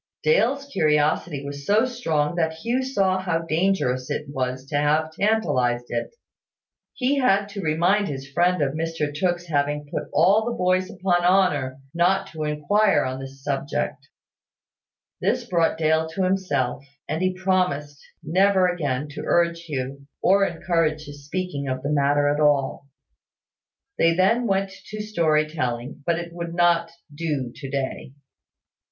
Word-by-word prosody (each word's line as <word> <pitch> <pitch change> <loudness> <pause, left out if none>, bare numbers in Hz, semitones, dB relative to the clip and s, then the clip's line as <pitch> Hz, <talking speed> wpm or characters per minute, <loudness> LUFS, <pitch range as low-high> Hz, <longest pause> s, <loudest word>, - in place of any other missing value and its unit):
Dale's 280 - +2
curiosity 150 - +1
was 140 0 -6
so 210 - +3
strong 165 -12 -1
that 160 -2 0
Hugh 235 +10 -1
saw 195 -8 +1
how 170 -3 -1
dangerous 160 -7 0
it 150 - -2
was 130 -1 -3
to 145 - -3
have 155 +2 +1
tantalised 160 - +1
it. 120 - -3 0.8
He 275 +2 +1
had 200 -6 +3
to 200 -1 -6
remind 180 +6 +2
his 135 -1 -5
friend 175 +3 +2
of 135 -1 -1
Mr 160 -2 -2
Tooke's 175 +3 -1
having 145 -2 -1
put - - -3
all 190 +8 +4
the 235 +1 -3
boys 185 0 +1
upon 180 -1 0
honour 180 -8 +2 0.2
not 175 +3 +2
to 155 -2 -4
inquire 175 +8 +2
on 130 0 -3
this 135 0 -10
subject. 135 - -3 1.1
This - - 0
brought 170 -2 +1
Dale 160 0 +2
to 190 - 0
himself; 185 -9 0 0.2
and 160 - -2
he 185 0 +1
promised 180 -7 0 0.2
never 185 +3 +3
again 150 -6 -2
to 145 - -7
urge 170 0 +1
Hugh, 140 -2 -5
or 195 +1 +4
encourage 165 -3 0
his 145 -1 -11
speaking 180 -5 -3
of 130 0 -3
the 145 - -1
matter 145 0 +2
at 145 +1 +1
all. 140 -2 +1 1.1
They 165 0 +4
then 230 +7 +3
went 195 -1 0 0.2
to 215 - -7
story 165 -8 +1
telling; 130 -4 -4
but 170 -1 +2
it 170 0 -6
would 170 -1 -5
not 170 -1 +3 0.3
do 145 -6 -2
to 135 +1 -8
day. 135 -1 -4
165 Hz, 150 wpm, -24 LUFS, 145-185 Hz, 1.1 s, all